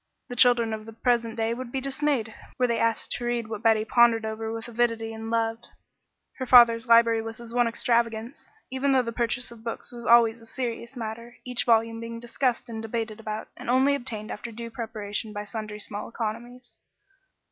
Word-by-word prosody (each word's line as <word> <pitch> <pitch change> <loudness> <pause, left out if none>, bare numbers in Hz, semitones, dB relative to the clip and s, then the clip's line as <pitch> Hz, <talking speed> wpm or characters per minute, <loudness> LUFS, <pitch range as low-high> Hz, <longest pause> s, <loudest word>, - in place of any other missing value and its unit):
The 245 - -5
children 240 -3 +4
of 215 0 -6
the 225 - -9
present 230 0 0
day 225 0 0
would 245 0 -6
be 265 - -1
dismayed 270 -4 -1 0.2
were 255 - +3
they 235 -1 0
asked 230 -1 0
to 240 - -2
read 240 -2 -1
what 220 -1 -5
Betty 220 -1 +3
pondered 230 -1 +4
over 220 0 -4
with 225 +1 -5
avidity 230 -1 0
and 225 0 -6
loved. 225 0 -1 0.7
Her 260 - -3
father's 235 -1 +7
library 230 -1 +5
was 225 0 -7
his 235 -1 -9
one 245 -1 +3
extravagance, 230 +1 -1 0.2
even 270 +1 +1
though 260 -1 +4
the 230 - -4
purchase 235 +1 -2
of 230 -1 -13
books 230 +2 -5
was 240 0 -8
always 230 -1 +5
a 225 - -15
serious 235 0 -4
matter, 230 +1 -6
each 250 -1 -2
volume 230 -1 +3
being 230 0 -6
discussed 240 +1 -1
and 225 -2 -5
debated 225 -1 -4
about, 215 -1 -5
and - - -8
only 260 +3 +4
obtained 235 -6 -4
after 230 +3 -6
due 230 +1 -7
preparation 220 -2 -4
by 205 0 -4
sundry 210 0 -6
small 210 0 -6
economies. 240 +2 -6
230 Hz, 195 wpm, -26 LUFS, 225-240 Hz, 0.7 s, father's